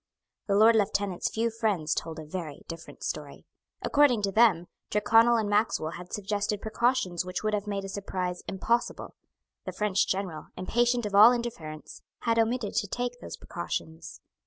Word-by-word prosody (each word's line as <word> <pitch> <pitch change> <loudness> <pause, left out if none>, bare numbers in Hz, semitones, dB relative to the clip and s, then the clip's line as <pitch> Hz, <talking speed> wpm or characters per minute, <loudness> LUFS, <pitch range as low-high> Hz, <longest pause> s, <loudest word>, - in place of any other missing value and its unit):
The 200 - +2
Lord 220 +3 +6
Lieutenant's 200 -3 0
few 230 +1 -1
friends 210 -9 0
told 165 -1 -4
a 155 - -7
very 155 -3 -6
different 165 0 -9
story. - - -5 0.4
According 280 -7 +3
to 200 - +1
them, 195 -5 +4 0.2
Tyrconnel 225 +3 +4
and 220 -2 0
Maxwell 205 -6 +1
had 180 +1 -9
suggested 205 0 -2
precautions 220 -5 0
which 180 +2 -5
would 215 0 0
have 210 0 -1
made 200 -1 -3
a - - -5
surprise 185 -2 -4
impossible. 235 +5 -1 0.5
The - - -5
French 205 -2 +1
General, 190 -5 -3
impatient 240 +5 +1
of 205 - -4
all 210 +4 +9
interference, 170 -11 -5 0.2
had 230 -1 +1
omitted 225 -1 0
to 205 - +1
take 245 +3 -3
those - - -7
precautions. 160 -2 -6
205 Hz, 160 wpm, -28 LUFS, 180-230 Hz, 0.5 s, all